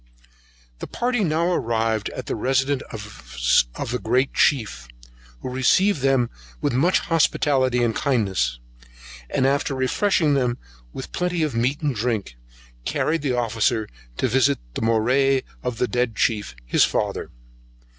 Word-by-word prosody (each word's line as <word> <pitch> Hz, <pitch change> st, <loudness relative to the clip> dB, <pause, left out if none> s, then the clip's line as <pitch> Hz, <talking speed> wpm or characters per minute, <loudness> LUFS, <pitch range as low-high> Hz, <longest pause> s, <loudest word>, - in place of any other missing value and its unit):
The -, -, -6 dB
party 245 Hz, -2 st, -1 dB
now 170 Hz, +1 st, +1 dB
arrived 115 Hz, -5 st, 0 dB
at -, -, -7 dB
the -, -, -3 dB
residence 135 Hz, +4 st, +1 dB, 0.9 s
of -, -, -4 dB
a 125 Hz, -, -1 dB
great 130 Hz, +2 st, +1 dB
chief, 110 Hz, -, +1 dB, 0.5 s
who -, -, -5 dB
received 145 Hz, +7 st, +3 dB
them 135 Hz, -3 st, +2 dB, 0.3 s
with -, -, -1 dB
much 160 Hz, +9 st, +3 dB
hospitality 140 Hz, -7 st, +2 dB
and 115 Hz, -2 st, 0 dB
kindness; 95 Hz, -, 0 dB, 0.7 s
and 130 Hz, -, +1 dB
after 140 Hz, +1 st, +1 dB
refreshing 150 Hz, +4 st, +1 dB
them 125 Hz, -3 st, +1 dB, 0.3 s
with 130 Hz, -, -8 dB
plenty 180 Hz, -2 st, -1 dB
of 150 Hz, -, -1 dB
meat 125 Hz, +6 st, 0 dB
and 150 Hz, -3 st, 0 dB
drink, 110 Hz, -, -2 dB, 0.5 s
carried 160 Hz, -, 0 dB
the 130 Hz, -4 st, -1 dB
officer 115 Hz, -2 st, 0 dB, 0.3 s
to -, -, +1 dB
visit 130 Hz, +3 st, +3 dB, 0.2 s
the -, -, -4 dB
Morai 130 Hz, +4 st, +2 dB, 0.2 s
of 125 Hz, -2 st, -3 dB
the 125 Hz, -, +1 dB
dead 120 Hz, -2 st, -1 dB
chief, 105 Hz, -, 0 dB
his -, -, +3 dB
father. -, -, -1 dB
130 Hz, 140 wpm, -23 LUFS, 115-145 Hz, 0.9 s, received